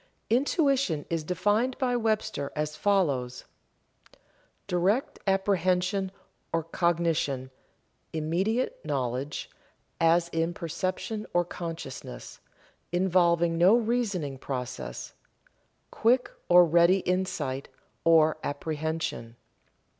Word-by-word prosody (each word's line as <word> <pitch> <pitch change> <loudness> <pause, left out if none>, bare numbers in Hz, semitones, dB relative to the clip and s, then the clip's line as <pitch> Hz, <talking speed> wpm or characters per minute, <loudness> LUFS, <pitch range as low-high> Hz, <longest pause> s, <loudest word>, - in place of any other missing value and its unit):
Intuition 270 - +2
is 165 -2 0
defined 205 +9 +1
by 250 -2 +1
Webster 215 -11 -1
as 150 0 -2
follows: 145 -12 0 1.2
"Direct 190 +9 0
apprehension 190 0 +1 0.4
or 165 0 0
cognition; 165 -6 0 0.6
immediate 180 +10 -1
knowledge, 135 -1 -2 0.5
as 165 +1 +4
in 165 +1 -1
perception 185 +6 -3
or 175 0 +3
consciousness, 165 -6 -7 0.5
involving 170 -2 +2
no 185 +6 +7
reasoning 210 - -1
process; 125 - -5 0.8
quick 250 +3 +2 0.2
or 175 0 +8
ready 170 +3 +4
insight 180 -8 -2 0.3
or 160 -1 +5
apprehension." 155 -5 -3
170 Hz, 85 wpm, -28 LUFS, 155-195 Hz, 1.2 s, or